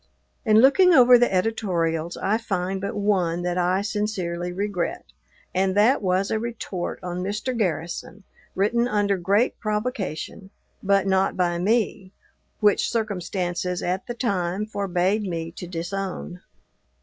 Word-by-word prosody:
In 215 -1 +6
looking 350 +7 +6
over 250 -1 +8
the 245 - +3
editorials 175 -5 -1
I 215 +3 0
find 190 -3 -2
but 200 - -3
one 185 -5 0
that 175 0 -1
I 180 +2 +1
sincerely 190 -5 -2
regret, 200 - -3 0.5
and 190 0 +1
that 230 +7 +4
was 190 0 0
a 220 - +1
retort 220 -6 -4
on 180 0 -4
Mr. 210 +7 -2
Garrison, 175 0 -3 0.3
written 235 +5 +2
under 205 -3 +1
great 200 +7 +1
provocation, 210 -4 -3 0.3
but 195 -1 +2
not 190 0 +1
by 175 -1 +1
me, 200 -1 0 0.5
which 210 -1 +3
circumstances, 180 -4 -2
at 185 +2 -2
the 240 - -4
time, 195 -4 -1
forbade 200 -1 0
me 165 -4 -4
to 180 +1 -8
disown. 180 +1 -5
195 Hz, 135 wpm, -24 LUFS, 180-215 Hz, 0.5 s, over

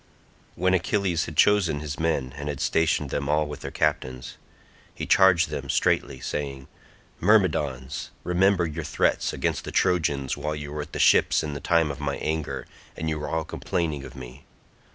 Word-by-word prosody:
When 95 +2 +2
Achilles 95 -2 +1
had 75 - -8
chosen 95 -6 +4
his 75 0 -5
men 70 -6 0
and 75 0 -5
had 70 -2 -4
stationed 80 -4 +1
them 70 0 -2
all 75 +1 +2
with 75 0 -7
their - - -6
captains, 65 0 -2 0.6
he - - -4
charged 90 -5 +5
them 70 -2 -5
straitly 65 - +1
saying, 70 0 -4 0.5
"Myrmidons, 75 -11 +1
remember 90 0 +3
your 80 0 -4
threats - - +1
against - - -2
the - - -6
Trojans 75 -7 +1
while 75 +1 -3
you 75 -1 -6
were 75 - -3
at 75 - -9
the - - -3
ships - - +4
in 75 -2 -4
the 70 - -5
time 80 -2 +2
of 70 - -8
my 70 -1 -2
anger, 75 -4 -3 0.3
and 80 - -2
you 75 -1 -2
were 75 - -4
all 80 -1 -1
complaining 80 -4 -2
of 65 +1 -10
me. 65 +1 -10
75 Hz, 180 wpm, -25 LUFS, 70-85 Hz, 0.6 s, charged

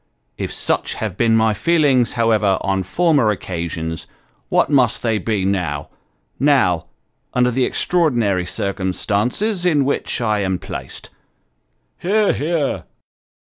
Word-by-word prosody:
If - - -4
such - - -1
have 105 -5 -4
been 115 +1 +3
my 110 -1 +3
feelings, 140 -2 +2
however, 110 -4 +2
on 95 -1 0
former 145 - +2
occasions, 85 -4 -4 0.4
what - - +3
must 130 -5 +2
they 110 -2 +1
be 105 -4 -1
now 90 -7 -2 0.5
now 135 - +2 0.5
under 125 0 +3
the 125 +1 +1
extraordinary 120 - +1
circumstances 105 - -1
in 150 -6 +3
which 140 - -1
I 110 -3 +1
am 95 -2 0
placed. - - -8 0.9
(Hear! 205 +3 +2
hear!) 155 -2 -1
115 Hz, 120 wpm, -19 LUFS, 95-140 Hz, 0.9 s, been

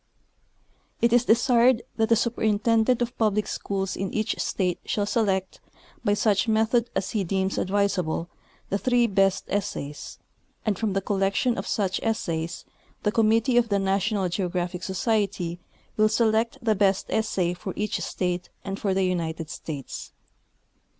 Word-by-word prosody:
It 235 0 +3
is 245 0 +4
desired 240 +1 +4
that 220 0 +2
the 230 - +6
superintendent 230 +1 +2
of 240 - -5
public 215 -2 +2
schools 195 -2 -3
in 195 0 -3
each 215 -1 -1
state 180 -3 -1
shall 205 - -1
select, 195 -4 0 0.4
by 205 - +2
such 210 +1 +2
method 225 +2 +2
as 190 - -1
he 210 -3 0
deems 190 +1 -1
advisable, 190 -4 0 0.4
the 200 - 0
three 245 0 +3
best 195 -2 +2
essays, 150 -7 -4 0.5
and 215 -2 +1
from 220 -3 0
the 195 - 0
collection 195 +5 +1
of - - -4
such 195 -3 0
essa3''s 170 -7 -2 0.4
the 210 - +2
com 220 0 +3
mittee 230 +2 +4
of 230 -1 0
the 200 - +2
National 195 0 +1
Geographic 180 0 -2
Society 190 -3 -1 0.4
will 215 0 +4
select 225 +1 +2
the 220 -2 +3
best 195 -1 +2
essay 190 -5 0
for 180 +2 -6
each 210 +1 -1
state 180 -1 -2 0.2
and 195 0 -4
for 195 -2 0
the 190 - +2
United 165 -3 -2
States. 145 -5 -7
205 Hz, 150 wpm, -25 LUFS, 190-225 Hz, 0.5 s, the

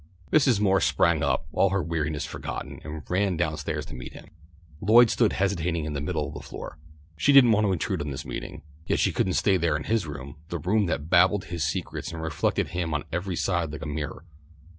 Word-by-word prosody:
Mrs. 135 -8 +4
Moore 95 -2 +3
sprang 85 -2 +2
up, 70 0 0
all 100 - +3
her 100 -1 0
weariness 80 -3 -2
forgotten, - - -6
and 75 0 -7
ran 95 -1 +1
down 80 -3 0
stairs 75 0 -3
to - - -10
meet 60 -1 -8
him. - - -12 0.5
Lloyd 115 +3 +6
stood 115 -3 +2
hesitating 90 -4 0
in 75 - -4
the 70 - -3
middle 75 -1 -2
of - - -8
the - - -6
floor. - - -9 0.4
She 80 - +3
didn't 135 -4 +8
want 105 0 +3
to - - +2
intrude 85 - -2
on 75 - -3
this 65 - -5
meeting, - - -6 0.2
yet - - +1
she - - +2
couldn't 95 - 0
stay 95 0 +3
there 80 -3 +1
in 75 - -6
his 110 -6 0
room, 70 -1 -8
the 85 - -2
room 100 +5 +1
that 80 -1 -3
babbled 95 +3 +5
his 85 -1 -3
secrets 80 +4 -3
and 85 - -6
reflected 80 -2 0
him 85 -3 -2
on 75 - -1
every 90 +2 -2
side 85 -3 0
like 75 - -7
a - - -5
mirror. 75 +2 -5
85 Hz, 225 wpm, -26 LUFS, 75-95 Hz, 0.5 s, didn't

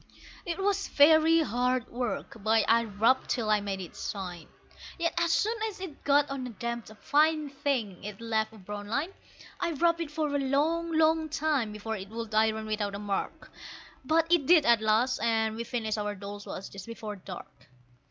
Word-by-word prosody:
It 340 -1 -2
was 395 0 0
very 315 +2 +6
hard 250 -2 0
work, 240 -3 -4
but 220 +1 +3
I 230 +1 +4
rubbed 225 +5 +2
till 220 -3 0
I 210 -1 +3
made 200 -1 -3
it 180 -3 -8
shine; 180 -5 -6 0.5
Yet 335 -1 0
as 340 -1 +1
soon 435 +6 +2
as 410 - -11
it 370 -6 -8
got 285 0 +4
on 270 -2 -4
a - - -6
damped 235 +1 -5
"fine 305 +1 +2
thing" 260 -9 -2
it 205 -1 -7
left 220 -1 -1
a 220 - -14
brown 205 +1 -7
line. 290 - -1 0.5
I 340 -1 -1
rubbed 335 +3 +2
it 325 - -3
for 300 -1 -2
a - - +2
long, 310 +5 +1
long 320 0 +3
time 290 -7 0
before 215 +1 -4
it 195 0 -8
would 225 0 -6
iron 220 0 +2
without 210 -2 -2
a - - -3
mark, 200 -1 -4 0.5
But 320 +4 +3
it 325 -6 +3
did 330 -4 +6
at 235 -2 +5
last, 225 +4 +2
and 220 -1 +1
we 230 - -3
finished 225 -3 -2
our 210 0 -2
Dolls' 200 +1 -8
Wash 195 - -6
just 195 0 -10
before 220 -2 -6
dark. 180 -8 -11
235 Hz, 190 wpm, -29 LUFS, 210-305 Hz, 0.5 s, very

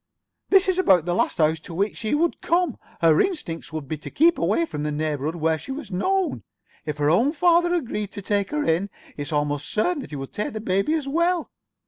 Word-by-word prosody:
This 390 0 +5
is 375 -1 +1
about 185 - +4
the 175 - 0
last - - 0
house 160 0 +2
to 165 +2 -9
which 200 +4 -1
she 220 +5 -1
would 335 +3 0
come. 340 -5 +1 0.2
Her 160 -2 +5
instinct 170 - -3
would 155 -3 -5
be 155 +1 -4
to - - -8
keep 335 +3 +3
away 335 - +2
from 150 - -6
the 150 0 -1
neighborhood 150 +1 -2
where 160 -1 0
she 270 - -8
was 265 -6 -6
known. 375 - 0 0.5
If 150 -1 -3
her 145 +1 +2
own 240 - +3
father 345 +1 +3
agreed 210 - -3
to 200 - -6
take 200 0 0
her 300 0 -1
in, 175 - +1 0.3
it's 145 +1 -5
almost 145 -1 -1
certain 300 +10 0
that - - -9
he 150 - -6
would 135 -1 -7
take 210 - -3
the 215 - -4
baby 195 +8 +1
as 300 -4 -3
well. 340 +4 0
200 Hz, 225 wpm, -24 LUFS, -, 0.5 s, This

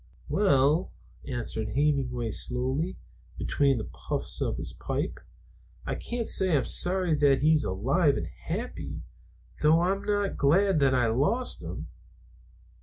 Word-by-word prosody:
"Well," 155 -3 +3 0.4
answered 110 -3 -4
Hemenway 130 -5 0
slowly, 130 - -2 0.4
between 140 -2 +1
the 110 - -3
puffs - - -5
of - - -1
his - - -4
pipe, - - -3 0.7
"I - - -2
can't 235 -1 -4
say 185 -5 +3
I'm 130 - 0
sorry 180 -2 +1
that 145 -3 +3
he's 155 0 +4
alive 135 - +1
and 85 - -3
happy, 80 - -6 0.6
though 155 +2 +5
I'm 190 +3 0
not 205 -1 -1
glad 175 +5 +3
that 135 -2 +3
I 125 -1 +3
lost 145 - +1
him. - - -6
145 Hz, 130 wpm, -28 LUFS, 130-180 Hz, 0.7 s, though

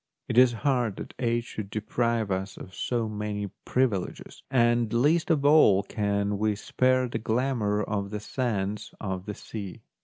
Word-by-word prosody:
It - - -2
is 125 0 +6
hard 125 -7 +2
that - - -8
age 120 -1 +1
should 105 -4 -7
deprive 110 0 -1
us 95 +1 -3
of 95 - -10
so 120 +1 -1
many 105 -2 -4
privileges, 120 -8 -1
and 120 -3 +3
least 150 +9 +2
of 150 -4 +2
all 145 -10 +6
can 100 -1 -1
we 105 -1 +1
spare 130 +4 +1
the 120 - -3
glamour 110 -3 0
of 100 -1 -2
the 105 0 -4
sands 105 -3 -3
of 95 -2 -4
the 105 - -4
sea. 100 -5 -8
110 Hz, 160 wpm, -27 LUFS, 100-125 Hz, -, is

